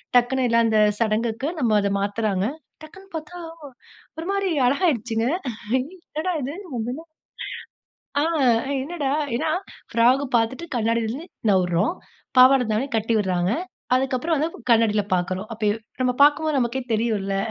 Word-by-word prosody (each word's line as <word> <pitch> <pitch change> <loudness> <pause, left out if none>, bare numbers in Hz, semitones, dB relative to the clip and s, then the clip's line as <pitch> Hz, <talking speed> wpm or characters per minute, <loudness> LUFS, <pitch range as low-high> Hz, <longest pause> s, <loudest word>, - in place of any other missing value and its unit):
டக்குனு 250 +1 +3
எல்லாம் 230 0 +3
அந்த 220 -1 +3 0.2
சடங்குக்கு 225 +3 0
நம்ம 230 -6 +2
அத 200 0 0
மாத்துறாங்க. 200 -1 0 0.4
டக்குன்னு 385 +5 -13
பார்த்தா, 320 +3 -6 0.8
ஒருமாரி 390 +4 -1 0.2
அழகாகிடுச்சுங்க. 245 - +1 0.5
ஐ! - - +1 0.3
என்னடா! 315 +4 -2
இது 275 +4 -4 0.2
முதல்ல 245 +7 -4 1.2
ஆ - - +2 0.6
என்னடா! 285 -2 -2 0.2
ஏன்னா 315 +5 -1 0.4
ஃப்ராக் 250 +4 +4
பார்த்துட்டு 245 +8 -1
கண்ணாடியிலருந்து 230 +6 -1 0.2
நவுறோம். 185 - +2 0.4
பாவாட 260 +1 +7
தாவணி 235 +6 0
கட்டி 225 +1 0
விட்றாங்க. 185 -2 0 0.4
அதுக்கப்புறம் 265 +5 +1
வந்து 310 +3 +1 0.2
கண்ணாடில 220 -2 +4
பார்க்குறோம். 185 +2 -2
அப்ப 220 -1 -1 0.3
நம்ம 250 -1 +2
பார்க்கும்போது 295 +1 +4
நமக்கே 245 +1 0
தெரியும்ல. 215 -3 0
235 Hz, 120 wpm, -23 LUFS, 215-285 Hz, 1.2 s, பாவாட